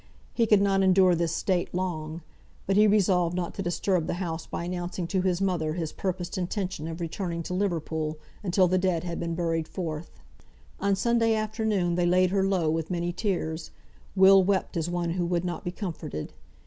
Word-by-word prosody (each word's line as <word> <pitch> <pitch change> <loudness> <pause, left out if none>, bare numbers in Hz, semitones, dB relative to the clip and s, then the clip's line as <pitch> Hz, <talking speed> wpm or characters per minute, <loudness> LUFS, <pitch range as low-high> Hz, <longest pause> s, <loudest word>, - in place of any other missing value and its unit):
He 230 -2 +2
could 210 -2 +5
not 195 -1 +3
endure 190 -1 +5
this 170 -1 0
state 180 -2 -1
long; 165 -3 -3 0.4
but 195 - +1
he 210 +1 +6
resolved 180 -4 +3
not 180 -1 -2
to - - -4
disturb 175 -1 0
the - - -1
house 165 -3 -4
by - - -4
announcing 175 0 -3
to 185 +2 0
his 180 -1 +1
mother 175 -5 0
his 160 -2 -3
purposed 185 0 -3
intention 180 -3 -3
of 165 +1 -6
returning 170 0 -3
to 180 - -5
Liverpool, 160 -5 -1 0.2
until 185 -1 +3
the 185 +1 +2
dead 180 -3 0
had 170 -1 -4
been 170 -1 -2
carried 165 -2 -1
forth. 160 -3 -5 0.7
On 200 0 +2
Sunday 230 +2 +2
afternoon 215 -4 0
they 175 0 +1
laid 180 +1 +3
her 195 -1 +2
low 190 -4 +1
with 160 0 -2
many 175 -1 -1
tears. 170 -6 -2 0.5
Will 190 0 +7
wept 190 0 0
as 165 0 -1
one 175 -1 -1
who 175 0 -1
would 175 0 0
not 175 -1 -4
be - - -2
comforted. 170 - -5
180 Hz, 190 wpm, -27 LUFS, 170-195 Hz, 0.7 s, Will